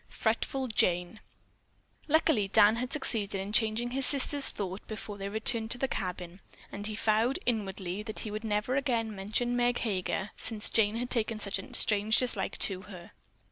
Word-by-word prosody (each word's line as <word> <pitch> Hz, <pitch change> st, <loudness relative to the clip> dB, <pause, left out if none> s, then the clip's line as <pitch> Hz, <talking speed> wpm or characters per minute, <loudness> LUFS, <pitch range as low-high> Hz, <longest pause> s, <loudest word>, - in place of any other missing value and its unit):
FRETFUL 255 Hz, +3 st, -2 dB
JANE 180 Hz, 0 st, +1 dB, 0.9 s
Luckily 300 Hz, -9 st, +2 dB
Dan 210 Hz, +2 st, +4 dB
had 250 Hz, +2 st, -4 dB
succeeded 215 Hz, -9 st, +1 dB
in 195 Hz, +2 st, -6 dB
changing 220 Hz, +2 st, 0 dB
his 270 Hz, 0 st, +2 dB
sister's 285 Hz, 0 st, +5 dB
thought 190 Hz, -1 st, -6 dB
before 215 Hz, -2 st, -7 dB
they 195 Hz, 0 st, -4 dB
returned 220 Hz, +1 st, +1 dB
to 245 Hz, -, +1 dB
the 270 Hz, -, -1 dB
cabin, 180 Hz, -4 st, -5 dB, 0.3 s
and 205 Hz, +1 st, -6 dB
he 215 Hz, -, -5 dB
vowed 220 Hz, +5 st, +1 dB
inwardly 195 Hz, -4 st, -3 dB
that 215 Hz, 0 st, -7 dB
he 215 Hz, -, -6 dB
would 215 Hz, +1 st, -5 dB
never 215 Hz, +3 st, -1 dB
again 235 Hz, -6 st, -1 dB
mention 220 Hz, +5 st, -1 dB
Meg 245 Hz, 0 st, +1 dB
Heger, 195 Hz, -2 st, -2 dB
since 220 Hz, -2 st, -2 dB
Jane 215 Hz, -1 st, +2 dB
had 245 Hz, +1 st, -4 dB
taken 225 Hz, -2 st, +2 dB
such 200 Hz, -1 st, -3 dB
a 195 Hz, -, -10 dB
strange 215 Hz, +1 st, +3 dB
dislike 250 Hz, -1 st, +1 dB
to 185 Hz, -2 st, -1 dB
her. 185 Hz, -4 st, -12 dB
215 Hz, 175 wpm, -29 LUFS, 200-240 Hz, 0.9 s, sister's